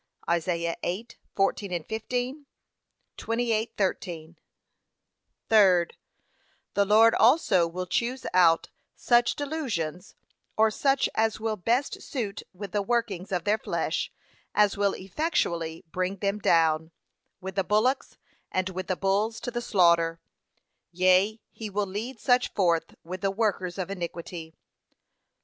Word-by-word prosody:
(Isa. 170 0 0
8:14, 195 -3 -2
15; 250 +6 -3 0.7
28:13) 210 -8 -2 1.1
Third, 185 -6 +4 0.8
The 200 - +3
Lord 220 +3 +6
also 220 - +4
will 180 +2 -4
choose 235 +7 -2
out 170 -3 +4 0.3
such 240 0 +3
delusions, 230 - -4 0.4
or 220 0 +4
such 270 +4 +2
as 220 0 +1
will 220 0 -1
best 235 +8 0
suit 215 -7 -4
with 195 0 -8
the 205 - 0
workings 200 -4 -1
of 180 -2 -1
their 210 +1 +1
flesh, - - -2 0.4
as 210 -1 +4
will 200 -1 +1
effectually 175 - -2
bring 185 +1 -1
them 200 +1 -1
down, 160 -3 +3 0.5
with 190 0 -6
the 195 - 0
bullocks 215 +8 +1 0.3
and 185 0 0
with 185 0 -5
the 185 - -1
bulls 205 +4 0
to 245 - -4
the 240 0 -3
slaughter: 170 -6 +3 0.7
yea, 185 +4 +3
he 220 -2 -7
will 205 +1 -1
lead 215 +6 -5
such 250 +1 +2
forth 170 -4 +1
with 180 +2 -7
the 195 - +1
workers 195 -3 -1
of 190 0 -3
iniquity. 170 -3 -6
195 Hz, 125 wpm, -27 LUFS, 180-225 Hz, 1.1 s, Lord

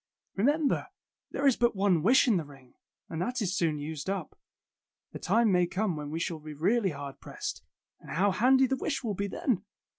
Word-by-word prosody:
Remem 290 +9 +2
ber, - - -1 0.4
there 280 - -2
is 270 -3 +5
but 240 -2 +2
one 190 -4 +2
wish 250 - +5
in 220 -6 +4
the 165 - -2
ring, 135 -3 -16 0.3
and 160 - -4
that 245 +6 -1
is 195 -3 -1
soon 165 -5 +1
used 150 +3 -5
up. 195 -5 -3 0.8
The - - -7
time 220 +2 +3
may 180 -1 +3
come 190 0 -1
when 150 -1 -5
we 160 +2 -3
shall 165 -1 -3
be 155 0 -9
really 195 +7 +2
hard 140 -3 -7
pressed, - - -6 0.4
and - - -14
how 195 +4 +2
handy 260 +7 +4
the 265 +1 0
wish 270 +1 -2
will 220 -3 -1
be 200 +1 -2
then! 200 0 -1
195 Hz, 210 wpm, -29 LUFS, 160-235 Hz, 0.8 s, is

